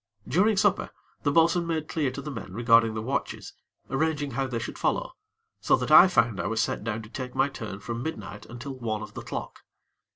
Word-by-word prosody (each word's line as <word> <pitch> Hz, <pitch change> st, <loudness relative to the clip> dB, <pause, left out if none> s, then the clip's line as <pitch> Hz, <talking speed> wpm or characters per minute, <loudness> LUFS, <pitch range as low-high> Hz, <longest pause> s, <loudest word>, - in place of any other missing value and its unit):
During 205 Hz, +4 st, +3 dB
supper, 205 Hz, -1 st, +2 dB, 0.3 s
the 145 Hz, -, +1 dB
bo'sun 165 Hz, +2 st, +3 dB
made 160 Hz, -2 st, -2 dB
clear 150 Hz, -5 st, 0 dB
to 140 Hz, +2 st, -7 dB
the 150 Hz, -, -5 dB
men 115 Hz, -7 st, -7 dB
regarding 115 Hz, 0 st, +4 dB
the 110 Hz, -, -3 dB
watches, 135 Hz, +4 st, -3 dB, 0.3 s
arranging 145 Hz, 0 st, -1 dB
how 135 Hz, +2 st, -1 dB
they 125 Hz, -2 st, -3 dB
should 115 Hz, -, -5 dB
follow, -, -, 0 dB, 0.5 s
so -, -, +4 dB
that -, -, -3 dB
I -, -, +10 dB
found 115 Hz, -, +2 dB
I -, -, -1 dB
was 115 Hz, -, -1 dB
set 105 Hz, -, -1 dB
down 110 Hz, 0 st, -3 dB
to 105 Hz, -, -12 dB
take 125 Hz, -1 st, -6 dB
my 140 Hz, -, +3 dB
turn 105 Hz, -7 st, -7 dB
from 120 Hz, +2 st, -4 dB
midnight 125 Hz, -8 st, -6 dB
until 120 Hz, +4 st, -7 dB
one 110 Hz, -4 st, -3 dB
of -, -, -10 dB
the -, -, -6 dB
clock. -, -, -6 dB
130 Hz, 215 wpm, -27 LUFS, 115-160 Hz, 0.5 s, I